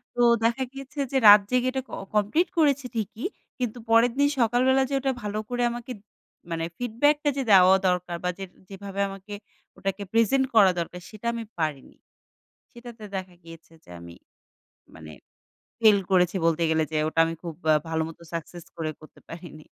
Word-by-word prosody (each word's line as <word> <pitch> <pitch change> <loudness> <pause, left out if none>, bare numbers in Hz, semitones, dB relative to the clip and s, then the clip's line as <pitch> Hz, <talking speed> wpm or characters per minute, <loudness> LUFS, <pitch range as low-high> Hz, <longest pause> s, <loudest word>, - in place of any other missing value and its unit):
তো 245 - 0 0.2
দেখা 235 +3 +1
গিয়েছে 275 +2 -9
যে 270 - +1
রাত 205 0 +10
জেগে 250 0 +2
এটা 265 0 -2
ক - - -17 0.2
কমপ্লিট 210 - +2
করেছি 285 -4 +2
ঠিকই 220 +1 -4 0.3
কিন্তু 245 -2 -3
পরের 230 +2 +5
দিন 285 0 +4
সকালবেলা 250 +3 +3
যে - - -4
ওটা 270 0 0
ভালো 210 0 -3
করে 245 0 -1
আমাকে 240 +1 -7 0.6
মানে 165 0 -2
ফিডব্যাকটা 290 +6 +1
যে - - 0
দেওয়া 190 -1 +7
দরকার 180 -1 -1
বা 180 - 0
যেটা 190 -2 -9
যেভাবে 195 0 -8
আমাকে 195 +1 -10 0.4
ওটাকে 195 +1 -3
প্রেজেন্ট 245 +4 +3
করা 200 -4 +7
দরকার 180 +1 -5
সেটা 215 +1 -8
আমি 230 -1 -4 0.2
পারিনি। 150 -4 -3 0.8
সেটাতে 235 -2 -11
দেখা 185 -1 -6
গিয়েছে 165 0 -14
যে - - -18
আমি 85 0 -11 0.8
মানে 80 -1 -11 0.7
ফেইল 215 -3 +6
করেছি 180 0 +3
বলতে 165 0 +2
গেলে 160 0 +2
যে 155 - -1
ওটা 160 - -2
আমি 165 - -3
খুব 170 -2 -5 0.2
আ - - +5
ভালো 160 0 -1
মতো 165 +1 -12
সাকসেস 170 +1 -6
করে 160 -2 -3
করতে 155 - -17
পারিনি। 165 -2 -10
205 Hz, 175 wpm, -25 LUFS, 170-245 Hz, 0.8 s, রাত